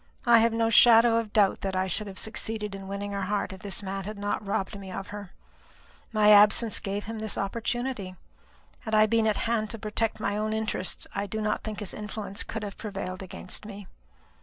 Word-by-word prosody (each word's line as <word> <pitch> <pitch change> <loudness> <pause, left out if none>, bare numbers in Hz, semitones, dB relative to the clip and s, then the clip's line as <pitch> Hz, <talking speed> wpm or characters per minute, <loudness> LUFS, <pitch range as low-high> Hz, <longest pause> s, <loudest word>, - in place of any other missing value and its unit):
I 235 -1 +7
have 230 +1 +3
no 225 0 +1
shadow 230 0 +7
of 225 -2 -2
doubt 205 -3 +3
that 190 -1 -2
I 185 0 +1
should 200 +3 -1
have 190 -1 -9
succeeded 220 -1 -2
in 195 -1 -8
winning 200 +1 -4
her 200 0 -3
heart 200 0 -1
if 190 - -11
this 200 0 -2
man 195 0 -4
had 210 +1 -6
not 205 +1 -2
robbed 200 0 -2
me 190 -1 -9
of 195 +1 -6
her. 205 -2 -7 0.8
My 210 -1 +5
absence 210 +2 +6
gave 200 +1 -3
him 225 +1 -6
his 215 -1 -2
opportunity. 230 -1 -3 0.6
Had 220 - -2
I 215 0 +6
been 225 0 +2
at 215 - +1
hand 225 -2 0
to 225 - -4
protect 215 +1 -2
my 205 -2 -1
own 215 +1 -1
interests, 220 -4 -2
I 200 0 -2
do 220 +3 -4
not 210 0 -1
think 215 -1 -5
his 205 - -4
influence 210 -1 -3
could 220 -1 -4
have 200 -1 -7
prevailed 195 -3 -5
against 185 0 -6
me." 205 -1 -9
210 Hz, 210 wpm, -27 LUFS, 195-220 Hz, 0.8 s, I